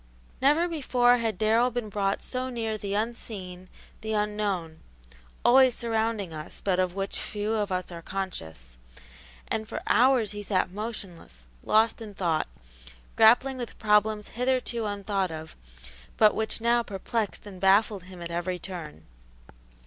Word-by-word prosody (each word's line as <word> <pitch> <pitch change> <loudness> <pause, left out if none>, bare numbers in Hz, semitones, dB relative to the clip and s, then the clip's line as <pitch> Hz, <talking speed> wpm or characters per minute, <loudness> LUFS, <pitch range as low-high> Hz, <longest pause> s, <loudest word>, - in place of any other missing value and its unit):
Never 300 +6 +4
before 250 -7 +3
had 225 -5 -1
Darrell 225 +4 +3
been 240 -3 -4
brought 200 -1 -1
so 255 0 -3
near 225 -3 -2
the 200 -1 -3
unseen, 200 -5 -4 0.3
the 220 0 -3
unknown, 205 -6 -1 0.7
always 260 -1 +6
surrounding 220 -5 -1
us, 155 0 -7
but 185 -2 0
of 185 -1 0
which 195 0 -3
few 210 +1 -3
of 210 -3 -1
us 185 0 -2
are 170 -1 -7
conscious, 80 - -6 0.7
and 220 0 -2
for - - -5
hours 245 -3 +4
he 205 0 -6
sat 185 -3 0
motionless, 190 - -7 0.2
lost 220 +1 +3
in 210 -3 -8
thought, 170 -5 0 0.7
grappling 245 +4 +5
with 240 -2 -6
problems 210 -1 +2
hitherto 250 -2 -1
unthought 200 -2 -1
of, 160 0 -8 0.6
but 215 -1 +6
which 220 +1 -2
now 235 +1 +3
perplexed 210 +1 -3
and 190 -3 -10
baffled 195 0 +3
him 180 -2 -10
at 170 - -6
every 175 +2 -2
turn. 175 -5 -8
210 Hz, 145 wpm, -27 LUFS, 185-230 Hz, 0.7 s, always